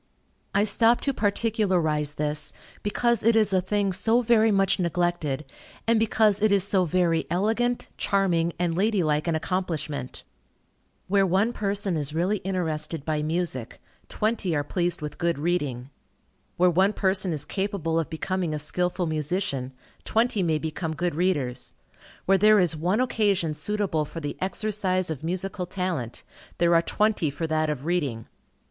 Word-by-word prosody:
I 200 - +4
stop 225 +3 +3
to 275 - 0
particularize 190 - 0
this, 150 0 -2 0.3
because 235 +2 +1
it 230 +1 +3
is 215 -3 +3
a 185 - +3
thing 200 +1 0
so 230 +6 +2
very 225 -1 +4
much 195 -1 +2
neglected, 170 -5 -1 0.4
and 230 -1 +3
because 215 -2 +2
it 215 -1 +3
is 200 -2 +5
so 195 -2 +2
very 170 -1 +1
elegant, 225 +7 0
charming, 175 -4 +1
and 170 -2 0
lady 200 0 +2
like 150 +1 0
an 165 - +1
accomplishment. 155 -6 -3 0.8
Where 195 +1 +3
one 195 +5 +2
person 200 -4 -1
is 150 0 -3
really 185 +6 +1
interested 165 -5 -3
by 155 -1 -1
music, 155 -6 -2 0.3
twenty 210 -6 -1
are 145 - 0
pleased 175 +1 -2
with 150 - -6
good 170 -2 0
reading. 145 -6 -2 0.7
Where 180 0 +4
one 190 +4 +3
person 190 -2 +1
is 150 -2 -3
capable 190 -5 -1
of 165 - -3
becoming 170 0 -2
a - - -2
skilful 180 +4 0
musician, 155 -4 -2 0.3
twenty 225 -2 +1
may 160 -3 +1
become 160 +1 -4
good 175 +3 -1
readers. 145 -7 -1 0.5
Where 195 0 +4
there 215 +2 +6
is 175 -4 +3
one 180 +9 +1
occasion 205 -10 +1
suitable 165 0 -1
for 165 - -7
the 145 -2 -4
exercise 190 -2 -1
of 155 -2 -5
musical 180 +2 -2
talent, 180 - -3 0.3
there 170 0 +3
are 165 - +5
twenty 210 -2 +1
for 145 +4 -4
that 155 -1 0
of 145 -2 -4
reading. 145 -10 -1
180 Hz, 155 wpm, -25 LUFS, 155-200 Hz, 0.8 s, there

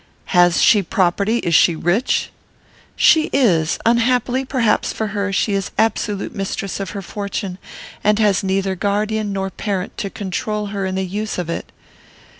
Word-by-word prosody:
"Has 175 -1 +5
she 210 - +5
property? 195 +5 +1
Is 170 -7 -1
she 165 +1 +5
rich?" 175 - 0 0.6
"She 315 -1 +4
is. 175 - +2
Unhappily, 245 +2 +2
perhaps, 255 -5 +1
for 220 -1 -3
her, 200 0 -2
she 200 +1 0
is 195 -1 -1
absolute 215 -2 0
mistress 195 0 -4
of 195 - -4
her 195 - -5
fortune, 195 -1 -5 0.4
and 210 0 +3
has 210 -3 +2
neither 190 0 0
guardian 210 +2 -1
nor 195 -1 -3
parent 195 -2 -3
to 200 - -3
control 210 +2 -3
her 195 -1 -2
in 185 - -3
the 190 0 -1
use 210 +4 -4
of 175 -2 -3
it." - - -5
200 Hz, 160 wpm, -19 LUFS, 190-215 Hz, 0.6 s, Has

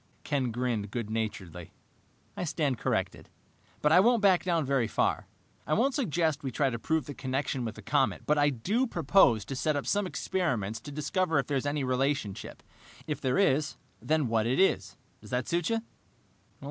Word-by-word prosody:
Ken 135 -4 0
grinned 115 -3 -2
good 110 -1 -4
naturedly. 95 -7 -4 0.6
"I - - -3
stand 145 -7 -1
corrected, - - -2 0.5
but 150 - +4
I 175 - +7
won't 230 +2 +4
back 190 -3 +5
down 170 -4 +1
very 135 -4 +1
far. - - 0 0.4
I 155 - +2
won't 265 +5 +2
suggest 160 - 0
we 135 - -3
try 135 +2 0
to 115 - -4
prove 160 +2 0
the 145 - -6
connection 130 -1 -2
with 110 - -5
the - - -11
comet, - - +1
but 150 - +3
I 145 0 +4
do 200 - 0
propose 150 - +3
to 135 - -5
set 150 +3 0
up 140 - -2
some 205 -1 +1
experiments 120 - -2
to 145 - -9
discover 160 +3 0
if 140 - +2
there 140 +1 -1
is 135 - -2
any 145 -1 -1
relationship. 130 -5 -2 0.4
If 150 -2 -4
there 130 +2 +1
is, 155 -6 +2 0.2
then 155 -3 +1
what 115 -1 +1
it 130 - +1
is. 95 - +2 0.2
Does 105 - -13
that 125 +1 -1
suit 170 -1 0
you?" 225 0 0
145 Hz, 190 wpm, -29 LUFS, 120-165 Hz, 0.6 s, I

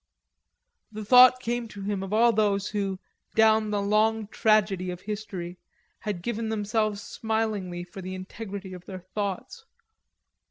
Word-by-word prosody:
The 215 0 -6
thought 250 +3 +8
came 240 -1 -2
to 200 -2 -9
him 200 -1 -2
of 195 0 -6
all 230 +2 +5
those 205 -2 +1
who, 200 -2 -2 0.4
down 220 -1 +4
the 205 -1 0
long 215 +2 +2
tragedy 205 -5 +2
of 180 0 -6
history, 190 -4 -6 0.4
had 200 -5 -4
given 230 0 -2
themselves 215 -1 -1
smilingly 215 -6 -2
for 180 +2 -10
the 185 +1 -5
integrity 195 0 -7
of 180 -1 -10
their 185 -1 -7
thoughts. 200 - -5
210 Hz, 145 wpm, -27 LUFS, 190-220 Hz, 0.4 s, thought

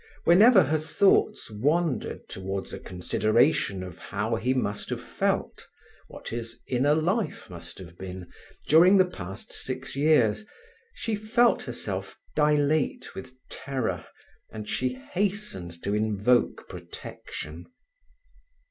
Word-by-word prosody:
Whenever 200 +4 +7
her 155 +3 +1
thoughts 190 - +2
wandered 145 +5 0
towards 95 +1 -5
a - - -5
consideration 105 - +1
of 90 -2 -9
how 105 +3 -2
he 115 +3 0
must 115 -6 -1
have - - -2
felt, - - -2 0.4
what - - -9
his 115 0 -5
inner 135 +4 +2
life 175 - -1
must 85 -1 -8
have 85 -2 -12
been, 95 -1 -7 0.4
during 175 +6 +7
the 185 - +6
past 95 - -8
six 130 +1 -5
years, 140 - +3 0.5
she 225 - -3
felt 230 +3 +3
herself - - -5 0.2
dilate 150 0 +2
with 130 0 -9
terror, 130 -3 -3 0.5
and 105 -1 -7
she 125 0 -1
hastened 185 - -3
to 100 - -1
invoke 110 +3 +1
protection. 75 +3 -8
130 Hz, 120 wpm, -27 LUFS, 105-160 Hz, 0.5 s, Whenever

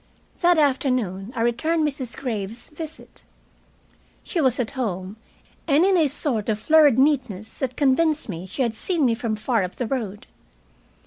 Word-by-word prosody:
That 350 -1 +4
afternoon 255 -9 0
I 230 - -2
returned 305 +7 +1
Mrs. 270 -5 -5
Graves's 225 -2 -4
visit. 315 0 -10 1.0
She 340 - -2
was 260 -3 +2
at 245 0 -1
home, 200 -7 -3 0.5
and 305 +3 +4
in 390 -1 +4
a 325 -4 +4
sort 255 -6 -2
of 215 - +1
flurried 295 +2 +5
neatness 255 -7 0
that 255 -2 -3
convinced 300 +2 +2
me 185 -2 -6
she 260 - -2
had 235 -3 0
seen 320 - 0
me 235 - +3
from 225 -1 -2
far 220 +1 0
up 180 - -5
the 250 - -2
road. 220 -2 -4
255 Hz, 165 wpm, -23 LUFS, 220-295 Hz, 1.0 s, flurried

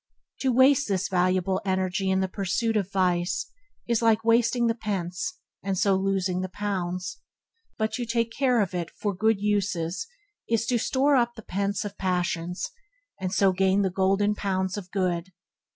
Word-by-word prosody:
To 265 - +1
waste 270 +3 +5
this 195 -2 0
valuable 185 0 +1
energy 190 0 0
in 190 0 +2
the 190 - +1
pursuit 200 +5 -1
of 200 -2 0
vice 180 -2 0 0.4
is 235 -1 +1
like 225 -1 +3
wasting 235 +1 +3
the 230 - +3
pence, 205 - -3 0.2
and 195 -1 -2
so 195 +1 +3
losing 190 -1 0
the 185 - -3
pounds, 185 -2 -3 0.6
but 220 0 0
to 245 +1 -2
take 230 0 0
care 250 -2 +2
of 190 -3 -1
it 170 -2 -2
for 205 -1 -3
good 220 +2 +2
uses 200 - -1 0.4
is 230 0 +1
to 240 0 +1
store 275 +5 +2
up 240 -2 +2
the 220 - -10
pence 200 +2 -2
of 205 0 -7
passions, 180 -1 -1 0.5
and 185 -1 -2
so 195 0 +4
gain 190 +2 +2
the 190 - 0
golden 195 +3 +2
pounds 190 -2 -1
of 195 -3 -7
good. 185 -2 -1
195 Hz, 170 wpm, -26 LUFS, 185-225 Hz, 0.6 s, waste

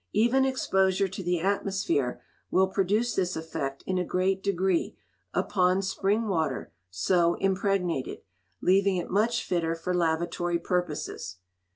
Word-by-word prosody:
Even 240 +5 +3
exposure 195 -7 +2
to 190 +1 -6
the 175 -1 0
atmosphere 195 -9 0 0.3
will 190 - +4
produce 210 +5 +1
this 185 -2 0
effect 160 -4 -4
in 185 -1 0
a - - +1
great 185 +2 0
degree 190 -2 0 0.3
upon 185 +1 +1
spring 200 +3 0
water 160 - -1 0.2
so 170 - +2
impregnated, 190 -6 -1 0.4
leaving 195 +1 +3
it 175 - -4
much 225 +5 +2
fitter 165 -2 0
for 165 +2 -3
lavatory 170 0 0
purposes. 170 - -3
185 Hz, 130 wpm, -27 LUFS, 170-195 Hz, 0.4 s, will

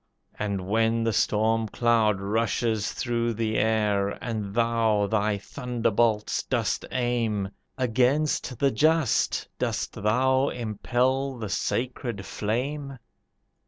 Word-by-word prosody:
And 100 -3 -2
when 115 +2 +2
the 115 -1 +1
storm 110 +2 +2
cloud 110 -2 +2
rushes 110 +1 0
through 120 -2 -1
the 110 0 -1
air, 105 -2 +2
And 110 -4 -4
thou 115 -3 +2
thy 105 +1 +1
thunderbolts 115 -1 0
dost - - -1
aim, 115 -5 0 0.3
Against 130 +2 +1
the 140 +2 +2
just 155 +1 +2
dost - - -2
thou 130 +6 +2
impel 125 +4 -1
the 110 -3 -5
sacred 120 -2 -2
flame? 135 +6 -3
115 Hz, 105 wpm, -26 LUFS, 105-125 Hz, 0.3 s, when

